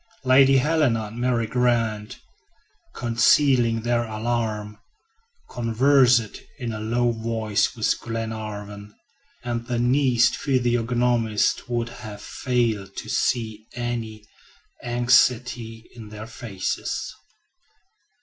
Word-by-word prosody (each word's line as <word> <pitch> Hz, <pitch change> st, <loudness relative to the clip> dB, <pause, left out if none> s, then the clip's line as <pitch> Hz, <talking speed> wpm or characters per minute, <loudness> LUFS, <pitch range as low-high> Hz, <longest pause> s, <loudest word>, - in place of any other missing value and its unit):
Lady 135 Hz, +1 st, +5 dB
Helena 135 Hz, -5 st, +2 dB
and 110 Hz, +3 st, -8 dB
Mary 120 Hz, -2 st, +1 dB
Grant, 115 Hz, -3 st, 0 dB, 0.8 s
concealing 120 Hz, 0 st, +3 dB
their 120 Hz, +1 st, 0 dB
alarm, 110 Hz, -1 st, -3 dB, 0.7 s
conversed 120 Hz, -1 st, +2 dB, 0.2 s
in 120 Hz, -5 st, -4 dB
a 110 Hz, -, -5 dB
low 120 Hz, +2 st, 0 dB
voice 110 Hz, -2 st, -1 dB
with 110 Hz, -, 0 dB
Glenarvan, 105 Hz, -2 st, -6 dB, 0.5 s
and 120 Hz, -1 st, -4 dB
the 120 Hz, -1 st, -1 dB
keenest 125 Hz, 0 st, +3 dB
physiognomists 120 Hz, -3 st, +1 dB
would 120 Hz, -1 st, -1 dB
have 110 Hz, -4 st, -9 dB
failed 110 Hz, -5 st, -2 dB
to -, -, -6 dB
see 110 Hz, -3 st, -1 dB
any 115 Hz, -3 st, -4 dB, 0.6 s
anxiety 120 Hz, -1 st, +1 dB
in 110 Hz, -3 st, -11 dB
their 105 Hz, +1 st, -8 dB
faces. 110 Hz, -4 st, -4 dB
115 Hz, 95 wpm, -23 LUFS, 110-125 Hz, 0.8 s, Lady